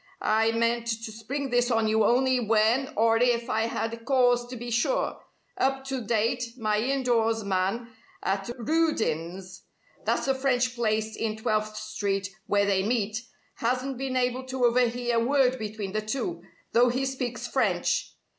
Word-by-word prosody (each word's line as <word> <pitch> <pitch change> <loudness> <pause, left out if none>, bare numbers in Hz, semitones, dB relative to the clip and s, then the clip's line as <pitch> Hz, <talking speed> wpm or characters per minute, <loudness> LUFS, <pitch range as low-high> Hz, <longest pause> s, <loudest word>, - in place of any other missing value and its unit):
I 220 +1 +3
meant 230 +1 +1
to 225 -1 -3
spring 255 +5 -4
this 245 0 +2
on 225 -2 +2
you 220 0 +3
only 255 +1 +3
when 225 +4 +2
or 225 +1 +4
if 240 0 +1
I 220 +1 +1
had 230 0 -3
cause 245 -2 +3
to 250 - -7
be 240 0 -6
sure. 240 - 0 0.4
Up 270 0 +1
to 265 -2 -2
date, 230 +2 -1
my 215 -3 +1
indoors 235 -3 +1
man 195 +4 -1 0.4
at 195 +2 -1
Rudin's 195 - -1 0.4
that's - - 0
the 270 - +2
French 255 -2 +1
place 220 -2 -1
in 220 -1 -2
Twelfth 215 0 -1
Street 200 -2 -2 0.2
where 200 0 +3
they 195 -1 +2
meet 215 +1 -1 0.4
hasn't 255 +2 -1
been 265 -1 -2
able 250 +1 0
to 260 -1 0
overhear 240 0 +2
a 230 - +3
word 260 0 +2
between 210 -2 -4
the 215 +2 -1
two, 215 -6 -3 0.3
though 245 +1 +5
he 255 +3 0
speaks 255 -3 -3
French. - - 0
235 Hz, 160 wpm, -27 LUFS, 215-250 Hz, 0.4 s, though